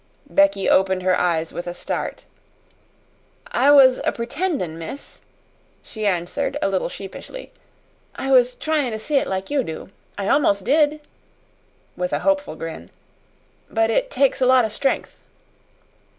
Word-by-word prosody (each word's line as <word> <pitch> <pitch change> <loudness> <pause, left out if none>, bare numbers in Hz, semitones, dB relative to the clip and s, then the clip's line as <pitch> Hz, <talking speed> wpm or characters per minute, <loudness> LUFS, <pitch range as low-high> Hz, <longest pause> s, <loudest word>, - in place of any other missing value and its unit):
Becky 295 -9 +3
opened 190 -1 +3
her 185 0 +3
eyes 165 -3 0
with 175 - -6
a 175 - -5
start. - - -4 1.3
"I 285 - +3
was 270 -3 +7
a - - +1
'pretendin',' 235 - -3
miss," 165 - -8 0.6
she 215 -2 -4
answered 175 -3 -1
a - - 0
little 190 -3 -1
sheepishly; 200 - -9 0.6
"I 270 - -3
was 250 -1 +5
tryin' 300 -7 -1
to 220 - -4
see 290 +6 0
it - - +1
like 190 +3 -4
you 285 -3 +1
do. 160 0 -7 0.3
I 200 -1 -3
almost 205 -8 +2
did," 300 +4 +2 0.9
with - - -3
a - - +1
hopeful 290 - +1
grin. 160 - -7 0.8
"But 225 0 +1
it - - +1
takes 275 0 +1
a 255 - +4
lot 255 -2 +5
o' - - -2
stren'th." 270 +6 -2
235 Hz, 150 wpm, -22 LUFS, 190-285 Hz, 1.3 s, was